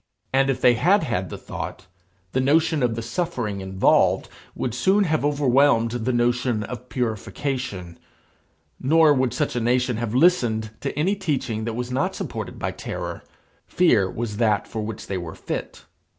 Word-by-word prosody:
And 135 Hz, +1 st, +3 dB
if 135 Hz, -, 0 dB
they 125 Hz, -, +6 dB
had 175 Hz, -, +3 dB
had 95 Hz, -, -2 dB
the -, -, -6 dB
thought, 95 Hz, -, -7 dB, 0.5 s
the 130 Hz, -, 0 dB
notion 155 Hz, +2 st, +2 dB
of 120 Hz, -2 st, +1 dB
the 115 Hz, -, -4 dB
suffering 115 Hz, -, -3 dB
involved 95 Hz, 0 st, +2 dB, 0.3 s
would 120 Hz, -, -2 dB
soon 190 Hz, -, +3 dB
have 155 Hz, -5 st, 0 dB
overwhelmed 140 Hz, -4 st, +3 dB
the 120 Hz, +1 st, -1 dB
notion 120 Hz, -2 st, +1 dB
of 125 Hz, +2 st, -8 dB
purification. 115 Hz, -5 st, -3 dB, 0.8 s
Nor 155 Hz, +2 st, +5 dB
would 130 Hz, -3 st, +1 dB
such -, -, -1 dB
a -, -, +1 dB
nation 125 Hz, 0 st, +1 dB
have 115 Hz, 0 st, -3 dB
listened 120 Hz, -9 st, +3 dB
to -, -, -3 dB
any 185 Hz, +7 st, +2 dB
teaching 130 Hz, -, -2 dB
that 115 Hz, -1 st, -3 dB
was 125 Hz, +1 st, -4 dB
not 130 Hz, +2 st, 0 dB
supported -, -, -5 dB
by -, -, -2 dB
terror. -, -, -6 dB, 0.5 s
Fear 115 Hz, -, +3 dB
was 110 Hz, 0 st, -4 dB
that 110 Hz, -3 st, +1 dB
for 110 Hz, -, -4 dB
which 110 Hz, 0 st, -6 dB
they 95 Hz, -2 st, -3 dB
were 85 Hz, -2 st, -7 dB
fit. -, -, -6 dB
125 Hz, 165 wpm, -23 LUFS, 110-145 Hz, 0.8 s, they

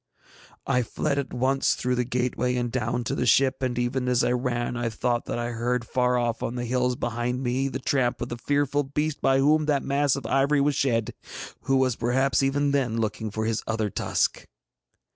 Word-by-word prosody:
I 125 Hz, -, +2 dB
fled 140 Hz, +4 st, -1 dB
at 135 Hz, -2 st, -4 dB
once 135 Hz, +2 st, +1 dB
through 125 Hz, 0 st, -1 dB
the 125 Hz, 0 st, +1 dB
gateway 125 Hz, 0 st, -1 dB
and 120 Hz, -1 st, -1 dB
down 120 Hz, 0 st, -1 dB
to -, -, -2 dB
the 125 Hz, -, -1 dB
ship, 135 Hz, +1 st, +3 dB
and 125 Hz, -2 st, -1 dB
even 125 Hz, +1 st, -1 dB
as 125 Hz, -1 st, +2 dB
I -, -, +2 dB
ran 120 Hz, -1 st, -1 dB
I 120 Hz, 0 st, -1 dB
thought 120 Hz, +1 st, -1 dB
that -, -, -3 dB
I 120 Hz, 0 st, -2 dB
heard 120 Hz, +1 st, -1 dB
far 125 Hz, +1 st, +1 dB
off 120 Hz, -1 st, -1 dB
on 120 Hz, -, -3 dB
the 120 Hz, -1 st, -3 dB
hills 125 Hz, +1 st, 0 dB
behind 120 Hz, +2 st, -2 dB
me 130 Hz, +2 st, 0 dB
the 130 Hz, -, -3 dB
tramp 130 Hz, -2 st, 0 dB
of 120 Hz, -, -4 dB
the 120 Hz, -, -5 dB
fearful 145 Hz, +1 st, +1 dB
beast 150 Hz, +2 st, -2 dB
by 135 Hz, -, +3 dB
whom 150 Hz, +3 st, +3 dB
that 145 Hz, -3 st, +1 dB
mass 140 Hz, 0 st, +1 dB
of 140 Hz, -, -6 dB
ivory 140 Hz, +2 st, +2 dB
was 145 Hz, +1 st, +2 dB
shed, 115 Hz, -5 st, 0 dB, 0.5 s
who 135 Hz, 0 st, +2 dB
was 130 Hz, -3 st, +2 dB
perhaps 130 Hz, +5 st, +1 dB
even 140 Hz, +1 st, +1 dB
then 130 Hz, -5 st, 0 dB
looking 110 Hz, 0 st, -2 dB
for 110 Hz, +2 st, -3 dB
his 115 Hz, -1 st, 0 dB
other 110 Hz, -2 st, -1 dB
tusk. -, -, -1 dB
125 Hz, 210 wpm, -25 LUFS, 120-135 Hz, 0.5 s, ship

